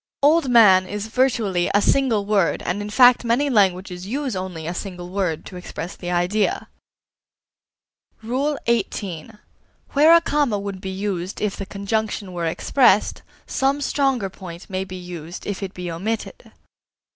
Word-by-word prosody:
"Old 300 -1 +4
man" 195 -6 +6
is 205 +1 -4
virtually 220 -7 +1
a - - +6
single 225 -2 +2
word 200 -4 +1
and 190 +4 -2
in 205 - -5
fact 245 +3 +6
many 245 +5 +1
languages 185 -3 +1
use 265 0 -2
only 185 -4 -5
a 170 - -3
single 180 -1 -6
word 185 -5 -2
to 185 - -9
express 180 -1 -7
the 175 - -7
idea. 180 +4 0 1.5
XVIII. 235 - -2 0.6
Where 310 +4 +7
a - - +7
comma 290 -9 +1
would 200 -2 -6
be 190 - -5
used 190 -1 -4
if 210 -2 -1
the 195 - -6
conjunction 200 -1 -3
were 170 -1 -2
expressed, 210 +5 +2 0.2
some 275 +2 0
stronger 270 -8 0
point 180 0 -10
may 190 0 -1
be 185 -1 -9
used 175 -2 -8
if 205 -1 -4
it 195 -1 -6
be 180 -1 -5
omitted. 215 +7 -5
200 Hz, 150 wpm, -22 LUFS, 180-235 Hz, 1.5 s, Where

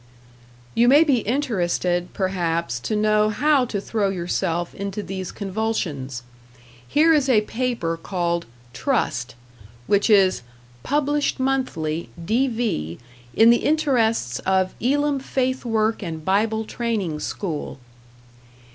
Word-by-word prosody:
You 235 +1 +3
may 285 +5 +7
be 280 -6 +2
interested, 180 -8 -1
perhaps, 170 - -1
to 215 - -2
know 215 0 +3
how 280 +4 +3
to 210 -4 -3
throw 205 0 -1
yourself 175 -1 -2
into 200 +1 -4
these 190 -2 -5
convulsions. 180 - -3 0.6
Here 320 - +4
is 285 -3 +2
a 220 -5 +5
paper 225 -7 -2
called 170 -2 -2 0.3
"Trust", 140 - -1 0.5
which 200 - +2
is 195 - +4 0.4
"published 290 - 0
Monthly 215 -13 -1 0.2
(D.V.) 225 - 0 0.4
in 225 +1 +7
the 235 - +5
interests 235 - +1
of 190 0 +1
Elim 285 +3 +1
Faith 260 -1 -2
Work 225 -1 +1
and 160 -4 -6
Bible 220 +3 +1
Training 215 -10 -2
School." 160 -4 -4
210 Hz, 115 wpm, -23 LUFS, 175-250 Hz, 0.6 s, may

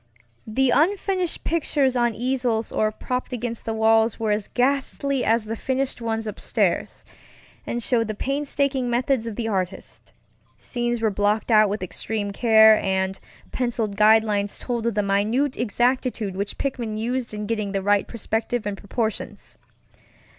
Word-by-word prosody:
The 255 +4 +2
unfinished 370 +3 +1
pictures 285 -5 +1
on 240 -2 +1
easels 245 -2 -1
or 215 0 +1
propped 250 +4 -4
against 235 -1 -4
the 225 - -2
walls 220 0 +3
were 220 -2 0
as 210 -1 -1
ghastly 275 +1 0
as 225 0 +2
the 225 +1 -3
finished 265 +2 -2
ones 225 -1 -2
upstairs, 215 - -1 0.6
and 240 0 -3
showed 230 -2 +2
the 215 - -4
painstaking 275 0 -1
methods 240 0 0
of 225 - -5
the 225 0 -3
artist. 190 -3 -4 0.5
Scenes 240 -2 -2
were 220 - +3
blocked 205 +3 0
out 215 -1 +6
with 205 0 -3
extreme 205 +3 -3
care, 220 0 +6
and 190 0 -1 0.3
penciled 235 -5 -1
guide 215 +2 +6
lines 205 -2 -1
told 235 -2 -3
of 230 - -1
the 210 - +1
minute 215 +8 +1
exactitude 240 -3 0
which 200 +1 -4
Pickman 235 -6 -3
used 240 +2 -2
in 210 0 -5
getting 210 -2 -2
the 195 -1 -2
right 205 0 +2
perspective 225 0 -2
and 205 -1 -3
proportions. 220 +1 -4
225 Hz, 155 wpm, -23 LUFS, 210-250 Hz, 0.6 s, out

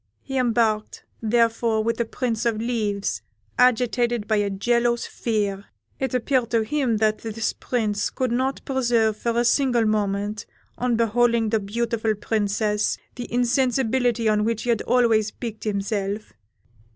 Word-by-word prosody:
He 270 - -6
embarked, 225 -3 0 0.2
therefore, 230 -1 +2
with 230 +1 0
the 235 - 0
Prince 230 0 -2
of 220 -2 0
Leaves, 215 -4 -1 0.4
agitated 240 -2 +2
by 215 - +2
a 205 -1 +1
jealous 235 +4 +1
fear. 205 -3 -2 0.3
It 265 -1 -1
appeared 250 -1 +1
to 230 -2 +2
him 250 -1 0
that 215 0 +1
this 225 0 -3
Prince 210 -4 -1
could 255 -2 -2
not 260 +3 -1
preserve 235 -5 +1
for 235 +1 -1
a 240 - +2
single 245 -2 +3
moment, 210 0 -1 0.3
on 245 -1 0
beholding 230 0 +2
the 220 - +2
beautiful 225 +1 -1
Princess, 210 0 0 0.2
the 245 -1 -7
insensibility 245 -1 +1
on 210 -1 +2
which 225 0 -1
he 245 - -3
had 230 - +1
always 225 -4 +3
piqued 225 -1 -7
himself. 200 0 -2
230 Hz, 145 wpm, -23 LUFS, 215-240 Hz, 0.4 s, single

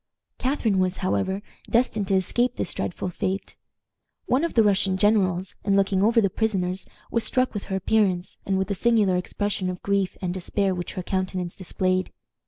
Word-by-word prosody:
Catharine 240 -7 +1
was, 185 0 +1
however, 190 +1 0 0.3
destined 225 -4 +1
to 195 - +2
escape 240 +7 +1
this - - -3
dreadful 185 - -3
fate. 190 +3 -3 0.7
One 260 +5 +2
of 335 - -2
the 225 - +6
Russian 195 -2 +2
generals, 190 -3 +2
in 200 -1 +2
looking 195 -1 +2
over 230 +3 +4
the 205 - +4
prisoners, 190 -4 -1 0.2
was 230 - +1
struck 255 -1 +1
with 205 - -4
her 190 - -3
appearance, 190 -2 +1
and 195 -1 0
with 190 +1 -1
the - - +1
singular 210 -2 +3
expression 190 +1 -2
of 180 -1 -6
grief 200 -2 0
and 180 -2 -2
despair 190 +1 0
which 175 -1 -5
her 185 - -4
countenance 185 -1 -2
displayed. 185 0 -1
195 Hz, 180 wpm, -25 LUFS, 185-215 Hz, 0.7 s, the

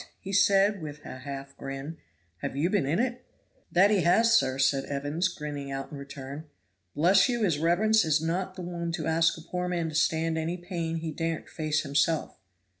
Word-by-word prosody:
said 200 +1 +5
he, 200 - -11
with 150 -2 -8
a 130 - -8
half 140 +1 -7
grin, 135 +4 -6 0.4
"have 90 - -5
you 160 +6 +1
been 200 -10 +1
in 155 +4 +1
it?" 250 +2 -1 0.5
"That 195 +4 +5
he 205 -3 +3
has, 225 +7 +4
sir," 130 -12 +2
said 135 0 +2
Evans, 145 +5 -1
grinning 145 -5 -6
out 135 0 -5
in 145 - -7
return. 140 +2 -8 0.5
"Bless 185 - +5
you, 240 -2 0
his 165 -7 +1
reverence 215 +7 +3
is 155 -1 +2
not 180 +4 -2
the 185 - -6
one 170 -1 -4
to 160 -3 -3
ask 165 +1 +2
a - - -9
poor 180 +2 -3
man 170 -2 -1
to - - -8
stand 160 0 +1
any 165 +3 -2
pain 170 -2 -4
he 160 -1 -3
daren't 165 +1 -3
face 155 -1 -1
himself." 150 +3 0
165 Hz, 195 wpm, -28 LUFS, 145-180 Hz, 0.5 s, said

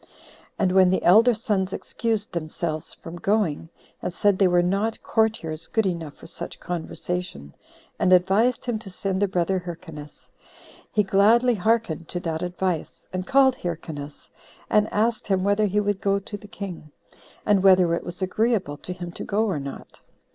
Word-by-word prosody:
And 190 -3 +2
when 185 -1 +5
the 185 - +1
elder 220 +7 +6
sons 200 -4 -1
excused 225 -4 -2
themselves 155 -1 -3
from 165 +1 -9
going, 175 -5 0 0.3
and - - -2
said 200 +2 +2
they 195 - +5
were 175 -1 +3
not 200 +5 -1
courtiers 170 -8 0
good 220 -2 +1
enough 165 -5 -3
for - - -15
such 165 - -7
conversation, 175 - -5 0.5
and 185 - +2
advised 195 +7 +3
him 240 -3 -1
to 215 -3 -10
send 190 +1 -2
their 205 - +3
brother 185 0 0
Hyrcanus, 165 -4 -10 0.6
he 210 - +3
gladly 220 +6 +4
hearkened 215 -6 0
to 175 - -4
that 160 -2 -3
advice, 180 -1 -3
and 185 0 -3
called 265 -1 +4
Hyrcanus, 155 -4 -6 0.4
and 210 0 +3
asked 220 +1 0
him 190 -2 +1
whether 205 +2 +2
he 205 +2 +1
would 205 -1 -1
go 200 0 +2
to 200 +1 -7
the 205 +1 -10
king, 180 -7 -8 0.5
and 205 -2 +4
whether 185 -3 +5
it 170 - -1
was 175 +2 -4
agreeable 195 -6 0
to 180 - -7
him 175 -1 -7
to - - -6
go 210 +2 +1
or 190 -9 -1
not. 140 0 -9
190 Hz, 170 wpm, -24 LUFS, 170-210 Hz, 0.6 s, elder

